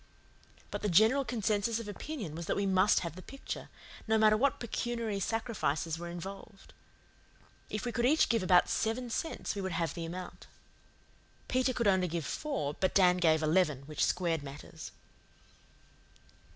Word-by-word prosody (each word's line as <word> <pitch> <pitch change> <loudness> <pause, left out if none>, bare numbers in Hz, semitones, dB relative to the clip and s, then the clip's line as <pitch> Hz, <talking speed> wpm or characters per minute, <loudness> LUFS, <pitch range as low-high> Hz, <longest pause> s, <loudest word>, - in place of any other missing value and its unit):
But - - -4
the 210 - 0
general 220 +10 +5
consensus 220 -2 0
of 230 -2 -6
opinion 210 - -6
was 170 +1 -6
that - - 0
we 200 - 0
must 190 +2 +4
have 170 -2 -5
the 185 - -9
picture, 275 +8 -7 0.4
no 220 0 +3
matter 215 0 +5
what 280 +5 +1
pecuniary 235 -3 -2
sacrifices 190 -7 -1
were 175 0 -6
involved. 195 +4 -9 1.0
If 215 +2 -4
we 240 - -1
could 240 +1 +1
each 310 +4 +4
give 230 -2 +1
about 180 -1 +5
seven 230 +2 -1
cents 325 - -3
we 200 - -4
would 190 -2 -3
have 165 -2 -1
the 170 -2 -5
amount. 180 +2 -8 1.0
Peter 255 0 +2
could 235 -3 0
only 190 -2 +3
give 165 -2 -3
four, 275 - -2
but 185 +4 -1
Dan 180 -2 +5
gave 160 -3 +3
eleven, 155 -4 +2
which 150 +1 -2
squared 170 -3 +1
matters. 140 +1 -9
195 Hz, 165 wpm, -31 LUFS, 170-230 Hz, 1.0 s, general